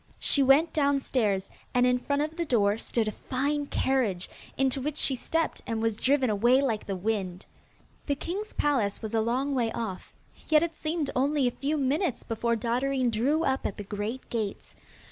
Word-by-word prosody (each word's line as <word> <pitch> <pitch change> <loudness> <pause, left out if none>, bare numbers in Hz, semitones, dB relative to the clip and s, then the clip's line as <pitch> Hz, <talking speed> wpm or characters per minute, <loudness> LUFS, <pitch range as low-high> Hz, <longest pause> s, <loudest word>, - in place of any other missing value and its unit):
She 280 - +5
went 280 +5 +5
downstairs, 265 -9 +1 0.3
and 250 0 +4
in 250 0 +3
front 285 +3 0
of 310 +1 -4
the 340 - -1
door 215 -7 +2
stood 230 -2 -1
a - - 0
fine 285 +5 -2
carriage, 235 -12 0 0.3
into 270 0 +1
which 300 +2 -3
she 270 - +2
stepped 325 +6 -2
and 225 -1 -2
was 225 -1 0
driven 265 +1 +2
away 240 +6 +4
like 235 -6 -1
the 195 - -2
wind. 190 -2 -3 0.6
The 285 - +1
king's 380 +9 -5
palace 235 -9 0
was 220 0 -5
a 225 - +2
long 255 +5 0
way 235 -4 0
off, 220 -6 -5 0.4
yet 310 0 +5
it 335 -1 -2
seemed 315 -1 -2
only 275 +2 +2
a - - +1
few 290 +5 -2
minutes 285 - 0
before 235 +1 -1
Dotterine 250 +2 0
drew 275 +9 +1
up 265 -2 0
at - - -6
the 205 - -6
great 210 +5 -5
gates. 215 -4 -4
255 Hz, 185 wpm, -28 LUFS, 225-285 Hz, 0.6 s, She